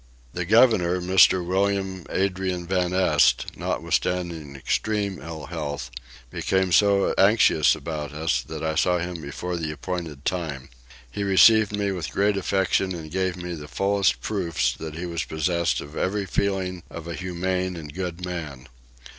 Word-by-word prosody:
The 90 0 -3
governor, 100 -4 +4
Mr. 90 0 +4
William 95 0 -1
Adrian 95 -2 -1
van 90 0 0
Este, 90 -9 +3
notwithstanding 85 -6 -2
extreme 100 +7 -1
ill 80 -2 -7
health, 70 -4 -5 0.4
became 95 -1 0
so 100 +1 +4
anxious 100 -6 +5
about 75 -2 -5
us 75 -3 0
that 80 +5 -7
I 80 0 0
saw 90 +3 +2
him 85 -1 -4
before 85 +5 -4
the 80 -2 -3
appointed 80 -2 -5
time. 75 -7 -3 0.4
He 100 - -4
received 105 +2 +5
me 100 -1 0
with 85 -7 -4
great 100 +8 +1
affection 95 -1 0
and 80 -2 -8
gave 95 -1 -1
me 90 0 -5
the 75 -3 -8
fullest 95 -5 +1
proofs 85 - -1
that 80 +4 -7
he 85 +2 -5
was 85 -2 -3
possessed 85 +2 0
of 75 +2 -10
every 100 +1 -1
feeling 95 -1 -1
of 85 0 -8
a 85 - -4
humane 90 +1 -2
and 75 -3 -8
good 90 0 -4
man. 75 -7 -6
90 Hz, 155 wpm, -24 LUFS, 80-95 Hz, 0.4 s, anxious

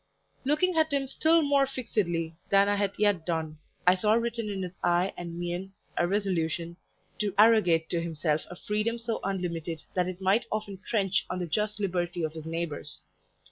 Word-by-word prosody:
Looking 305 +6 +2
at 315 -1 +3
him 280 -1 +1
still 320 +4 +3
more 280 -1 +3
fixedly 180 -11 -2
than 200 0 +5
I 205 - +2
had 200 -1 0
yet 205 -5 +2
done, 160 -2 -2 0.3
I 180 - +7
saw 210 +3 +2
written 230 -1 0
in 195 -2 -3
his 180 -1 -5
eye 175 +2 +2
and 170 -1 -6
mien 175 +2 -4 0.2
a 175 - +2
resolution 170 -4 -1 0.4
to 205 -2 -1
arrogate 205 -7 +5
to 170 - +1
himself 155 -2 0
a 175 - -7
freedom 215 +5 -1
so 230 -1 -3
unlimited 170 -4 -3
that 180 -1 +1
it 185 0 -5
might 200 +5 +2
often 205 -3 -3
trench 195 -3 0
on 180 - -2
the 180 - -2
just 210 +5 -1
liberty 175 -3 -1
of 155 -1 -2
his 160 -1 -8
neighbours. 165 -3 -4
190 Hz, 180 wpm, -28 LUFS, 170-215 Hz, 0.4 s, I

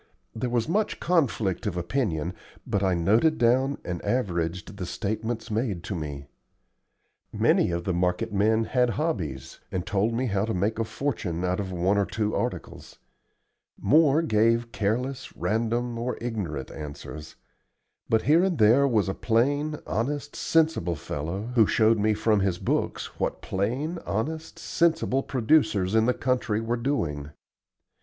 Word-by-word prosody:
There 120 +3 -2
was 120 -1 0
much 205 +6 0
conflict 120 - +1
of 90 -4 -2
opinion, 85 - -1 0.3
but 100 - 0
I 95 -2 +2
noted 110 - +3
down 130 +4 +2
and 85 -2 -4
averaged 90 -5 -2
the 95 - -4
statements 110 +3 -3
made 105 -6 -1
to 95 - -4
me. 75 -4 -5 1.1
Many - - +3
of 85 0 -2
the 95 - -1
market 90 +3 0
men 110 +3 +3
had 125 +1 +2
hobbies, 85 - -3
and 90 -1 -2
told 105 +3 0
me 125 +3 0
how 100 -3 0
to 110 - -2
make 105 +5 0
a 115 - +1
fortune 110 - -2
out 90 +2 0
of 95 -2 -3
one 95 +3 +1
or 100 - +1
two 110 0 -1
articles; - - -4 0.8
more 155 +1 +4
gave 115 -3 +2
careless, 125 +6 -2
random, 115 +2 -1
or 125 +2 -2
ignorant 95 - -4
answers; 75 0 -8 0.7
but 110 -1 +3
here 160 +4 +5
and 190 -4 +1
there 120 +5 +5
was 110 -7 +2
a 95 - -1
plain, 145 +8 +1
honest, 140 +6 -2
sensible 155 - +1
fellow 85 +11 -4
who 115 -4 +5
showed 110 0 +3
me 105 +1 +2
from 105 0 +2
his 95 -3 0
books - - -2
what - - -2
plain, 130 - -2
honest, 155 +10 -3
sensible 165 -5 +1
producers 110 -8 +2
in 110 +1 +4
the 125 - +3
country 125 -4 0
were 115 +1 -1
doing. 85 - -2
110 Hz, 150 wpm, -26 LUFS, 95-125 Hz, 1.1 s, here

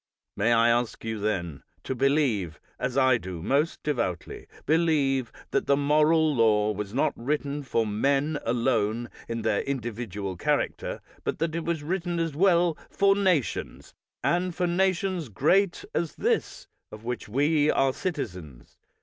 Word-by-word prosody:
May 110 +4 +2
I 115 0 +5
ask 120 0 0
you, 110 -1 -3
then, 85 -9 -2 0.2
to - - -2
believe, 130 - +1 0.2
as 125 +1 -2
I 130 -3 +4
do 90 -4 -7
most 145 - 0
devoutly 115 - -3 0.2
believe, 145 -6 +2 0.2
that - - 0
the 140 - +4
moral 155 +2 +3
law 110 -3 +3
was 105 -1 -5
not 130 - +1
written 145 +3 -2
for 115 -4 0
men 140 +8 +1
alone 115 -1 0 0.2
in 115 -1 -4
their 100 - +1
individual 110 -7 -4
char - - +2
acter, - - -4 0.2
but - - -2
that 160 0 -1
it 165 0 -3
was 170 -3 -2
written 175 +1 -2
as 165 -2 -1
well 175 -1 +3
for 195 0 +3
nations, 185 - -1 0.3
and 175 0 +1
for 180 - 0
nations 185 - 0
great 175 - +2
as 170 -2 -2
this - - -1 0.2
of 105 +1 -10
which 120 -2 -4
we 145 +5 +2
are 135 -1 +2
citizens. 90 - -6
135 Hz, 150 wpm, -27 LUFS, 110-160 Hz, 0.3 s, I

